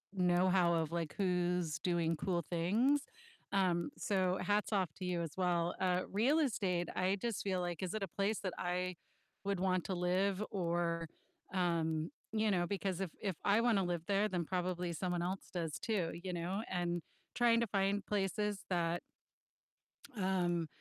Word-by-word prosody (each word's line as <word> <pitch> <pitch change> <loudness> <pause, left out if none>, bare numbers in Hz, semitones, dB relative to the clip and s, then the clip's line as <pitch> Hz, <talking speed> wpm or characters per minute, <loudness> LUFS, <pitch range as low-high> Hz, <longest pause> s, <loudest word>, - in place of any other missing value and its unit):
knowhow 180 -1 +4
of, 155 - -6
like, 165 -3 -2
who's 180 -4 +1
doing 170 -2 +1
cool 170 +1 -1
things, 225 +12 +3 0.5
um, 185 +1 +2
so 185 -3 +1
hats 205 +3 +1
off 185 -5 +2
to 185 - -3
you 175 -1 0
as 165 -3 -3
well, 175 -2 +1
uh, 185 -1 +2
real 250 +10 +3
estate, 190 - +1
I 190 +2 +2
just 235 -3 -1
feel 190 -2 0
like, 175 -1 -3
is 180 - -2
it 215 -2 -2
a - - -1
place 200 +5 0
that 185 -3 -3
I 180 0 -1 0.5
would 200 -2 0
want 185 -1 +1
to 190 - -2
live 185 +3 +1
or, 170 -3 0 0.5
um, 165 -3 +1 0.2
you 215 -1 +2
know, 175 -2 +2
because 195 -2 -2
if 190 - -1
if 195 -5 -1
I 205 +3 +5
wanna 225 -5 +3
live 175 -2 -1
there, 200 +1 +3
then 180 -2 0
probably 180 -1 -1
someone 175 +1 -1
else 185 +2 -3
does 165 -4 -2
too, 190 -7 0
you 185 -1 -3
know, 175 +4 -2
and 175 -1 -1 0.3
trying 235 -1 +4
to 235 - +1
find 200 0 +1
places 205 0 0
that 170 -1 +1 1.2
um, 175 -3 +1
180 Hz, 165 wpm, -36 LUFS, 175-195 Hz, 1.2 s, I